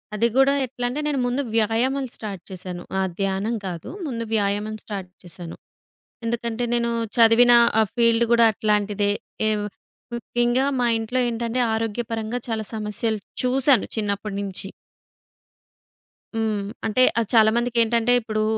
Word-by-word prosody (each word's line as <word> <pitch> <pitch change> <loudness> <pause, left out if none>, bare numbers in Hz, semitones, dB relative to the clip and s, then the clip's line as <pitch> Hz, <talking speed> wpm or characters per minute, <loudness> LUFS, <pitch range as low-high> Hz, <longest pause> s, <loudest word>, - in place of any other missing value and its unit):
అది 230 +3 +3
గూడా 270 +1 +5
ఎట్లాంటే 245 +2 -3
నేను 290 -2 0
ముందు 250 +3 0
వ్యాయామం 235 +5 +1
స్టార్ట్ 200 -5 -7
చేసాను. 180 -1 -6 0.2
ఆ! - - +2 0.2
ధ్యానం 195 +4 0
కాదు. 175 +3 -6 0.2
ముందు 230 -4 -3
వ్యాయామం 205 +1 0
స్టార్ట్ 195 -4 -6
చేసాను. 175 -1 -8 0.7
ఎందుకంటే 235 0 -2
నేను 235 0 0 0.3
చదివిన 235 +1 +6 0.3
ఆ - - +5
ఫీల్డ్ 230 -1 +4
గూడా 235 -1 +6
అట్లాంటిదే. 205 -1 +1 0.4
ఏవ్ 210 -1 0 0.5
ముఖ్యంగా 240 +2 0 0.2
మా 240 - +3
ఇంట్లో 225 +3 -2
ఏంటంటే, 235 +1 -1
ఆరోగ్యపరంగా 225 +1 -2
చాలా 220 -1 -2
సమస్యలు 215 +1 -2 0.2
చూసాను 260 -1 +3
చిన్నప్పడినించి. 200 -2 -3 1.7
హ్మ్. 220 -2 0 0.2
అంటే 220 +3 +1 0.2
ఆహ్, 230 - -1
చాలా 220 -2 +6
మందికేంటంటే 235 0 +2
ఇప్పుడు 215 -1 -1
225 Hz, 125 wpm, -23 LUFS, 210-240 Hz, 1.7 s, చదివిన